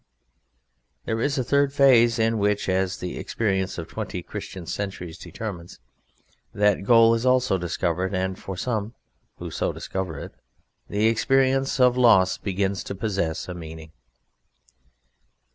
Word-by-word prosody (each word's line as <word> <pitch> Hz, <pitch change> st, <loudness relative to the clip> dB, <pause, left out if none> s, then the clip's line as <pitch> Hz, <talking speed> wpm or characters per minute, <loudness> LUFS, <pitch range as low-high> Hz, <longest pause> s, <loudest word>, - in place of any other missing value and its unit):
There 110 Hz, 0 st, -1 dB
is 145 Hz, +3 st, 0 dB
a 130 Hz, -, +1 dB
third 140 Hz, +2 st, +2 dB
phase, 125 Hz, -5 st, +5 dB
in 115 Hz, 0 st, +1 dB
which 105 Hz, 0 st, 0 dB
(as 95 Hz, 0 st, 0 dB
the 90 Hz, -, -5 dB
experience 95 Hz, -4 st, -1 dB
of 85 Hz, -, -5 dB
twenty -, -, -5 dB
Christian 95 Hz, -3 st, -7 dB
centuries 90 Hz, -3 st, -5 dB
determines) 95 Hz, -4 st, -8 dB, 0.8 s
that 105 Hz, -1 st, +2 dB
goal 115 Hz, 0 st, +6 dB, 0.2 s
also 125 Hz, -4 st, +3 dB
is -, -, -8 dB
discovered, 90 Hz, +2 st, -1 dB
and 95 Hz, +1 st, -2 dB
for 95 Hz, -2 st, -7 dB
some 110 Hz, 0 st, -3 dB, 0.4 s
who -, -, -7 dB
so -, -, -1 dB
discover 95 Hz, -5 st, -5 dB
it -, -, -8 dB, 0.6 s
the 105 Hz, +2 st, 0 dB
experience 135 Hz, +4 st, +2 dB
of 125 Hz, -1 st, +4 dB
loss 95 Hz, -7 st, +5 dB
begins 100 Hz, 0 st, -1 dB
to 100 Hz, -, -5 dB
possess 95 Hz, -6 st, -2 dB
a 90 Hz, -, -5 dB
meaning. 80 Hz, -2 st, -9 dB
100 Hz, 140 wpm, -24 LUFS, 95-115 Hz, 0.8 s, goal